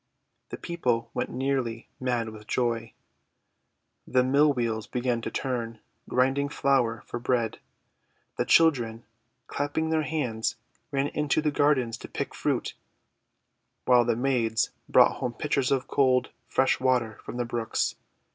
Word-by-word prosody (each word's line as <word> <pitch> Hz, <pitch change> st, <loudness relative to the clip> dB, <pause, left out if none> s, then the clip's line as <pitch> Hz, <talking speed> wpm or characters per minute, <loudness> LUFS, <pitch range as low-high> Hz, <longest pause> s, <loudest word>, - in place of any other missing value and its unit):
The -, -, -6 dB
people 120 Hz, -9 st, -1 dB
went -, -, -2 dB
nearly 130 Hz, -4 st, -2 dB
mad 120 Hz, -3 st, -1 dB
with 110 Hz, -1 st, -12 dB
joy. 115 Hz, -2 st, -1 dB, 1.1 s
The 125 Hz, 0 st, +3 dB
mill 140 Hz, +3 st, +4 dB
wheels 115 Hz, -4 st, -2 dB
began 120 Hz, -1 st, -1 dB
to -, -, -3 dB
turn, 120 Hz, -4 st, -3 dB, 0.3 s
grinding 135 Hz, +3 st, +2 dB
flour 130 Hz, -6 st, +1 dB
for 120 Hz, -, -5 dB
bread. 120 Hz, -2 st, 0 dB, 0.8 s
The -, -, 0 dB
children, 120 Hz, -9 st, +3 dB, 0.4 s
clapping 160 Hz, +3 st, -2 dB
their 160 Hz, -1 st, +2 dB
hands, 130 Hz, -8 st, -1 dB, 0.3 s
ran 140 Hz, 0 st, 0 dB
into 150 Hz, 0 st, 0 dB
the 155 Hz, -1 st, +1 dB
gardens 135 Hz, -6 st, +2 dB
to -, -, -8 dB
pick -, -, -4 dB
fruit, -, -, -1 dB, 1.1 s
while 125 Hz, -1 st, +6 dB
the 120 Hz, -1 st, +1 dB
maids 120 Hz, -3 st, +1 dB, 0.2 s
brought -, -, +5 dB
home 120 Hz, -, -3 dB
pitchers 140 Hz, +1 st, 0 dB
of 135 Hz, -2 st, +1 dB
cold, 130 Hz, -2 st, +2 dB, 0.2 s
fresh 130 Hz, -, +2 dB
water 125 Hz, -4 st, +1 dB
from -, -, -7 dB
the 120 Hz, -, -1 dB
brooks. 115 Hz, -1 st, -1 dB
125 Hz, 135 wpm, -27 LUFS, 115-140 Hz, 1.1 s, while